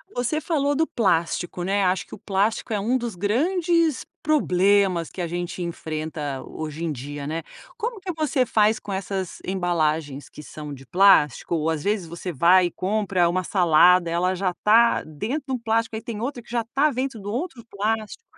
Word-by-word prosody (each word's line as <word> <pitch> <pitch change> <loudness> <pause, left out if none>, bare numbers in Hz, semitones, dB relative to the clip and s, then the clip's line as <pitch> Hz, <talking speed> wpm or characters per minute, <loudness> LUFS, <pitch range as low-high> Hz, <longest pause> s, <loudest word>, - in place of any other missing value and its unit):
você 250 +6 0
falou 290 -3 0
do 320 +3 +1
plástico, 175 -3 0
né. 195 +2 +1
Acho 185 +1 +1
que - - -9
o - - -14
plástico 200 +4 -1
é 210 - 0
um 235 +6 +1
dos 235 -5 -4
grandes 325 - +1 0.2
problemas 195 - +2
que - - -12
a 170 - -1
gente 175 +1 -4
enfrenta 155 -4 -4
hoje 155 +1 -6
em 165 - -1
dia, 145 +2 -6
né. 160 +1 -3 0.3
Como 465 -1 -3
que 370 -2 -5
você 300 -5 +1
faz 215 0 +3
com 200 - -6
essas 190 -1 -4
embalagens 160 -6 -1
que - - -11
são 150 +1 -8
de 135 -1 -11
plástico 180 -4 +4
ou 160 0 0
às 155 -2 -2
vezes 200 -4 -1
você 170 +2 -6
vai 175 +5 +5
e 175 - -7
compra 190 -2 0
uma 185 +2 0
salada, 175 -1 +4
ela 180 +2 +1
já 185 -1 -1
tá 230 +3 +5
dentro 215 - -4
de 265 - -4
um 255 - -1
plástico 225 0 0
aí 220 - -6
tem 225 -1 -6
outra 250 0 -3
que 235 - -21
já 235 -1 -1
tá 295 +3 +4
dentro 255 -3 -3
do 200 - -7
outro 255 -5 -4
plástico. 215 - -2
195 Hz, 195 wpm, -24 LUFS, 170-235 Hz, 0.3 s, vai